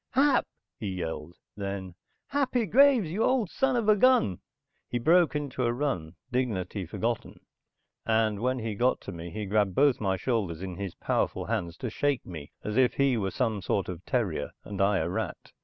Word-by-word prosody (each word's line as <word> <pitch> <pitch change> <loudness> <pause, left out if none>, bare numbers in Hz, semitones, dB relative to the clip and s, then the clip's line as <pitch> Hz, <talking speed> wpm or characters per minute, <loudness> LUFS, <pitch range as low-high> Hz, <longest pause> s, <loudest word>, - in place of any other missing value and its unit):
"Hap!" 275 +1 +4 0.3
he 105 - -4
yelled, 85 -3 -4 0.2
then. 100 -2 -4 0.4
"Happy 260 -4 +1
Graves, 245 - +5
you 210 +6 0
old 250 -7 +2
son 270 -1 +1
of 235 -3 0
a 215 - +7
gun!" 245 - +4 0.5
He 120 - -1
broke 165 +6 +4
into 140 -3 -2
a 120 - +2
run, 90 - -2 0.2
dignity 105 -7 -1
forgotten, 115 +6 -3 0.6
and 110 -2 +1
when 130 +3 0
he 115 -3 -3
got 125 +5 +2
to - - -7
me 85 -1 -7
he 105 +4 -4
grabbed 100 -2 +1
both 140 -4 +4
my 95 -2 +1
shoulders 95 -6 -1
in 95 -1 -4
his 100 -3 -5
powerful - - -1
hands 85 -1 -2
to 125 - -4
shake 140 0 0
me 80 -5 -8
as 105 +2 -3
if 130 -2 +4
he 140 -2 +3
were 100 -4 0
some 110 -3 -1
sort 95 +1 0
of 90 0 -6
terrier 95 - -1
and 100 -2 -4
I 100 0 +3
a 80 - 0
rat. 90 - -4
110 Hz, 190 wpm, -28 LUFS, 95-145 Hz, 0.6 s, a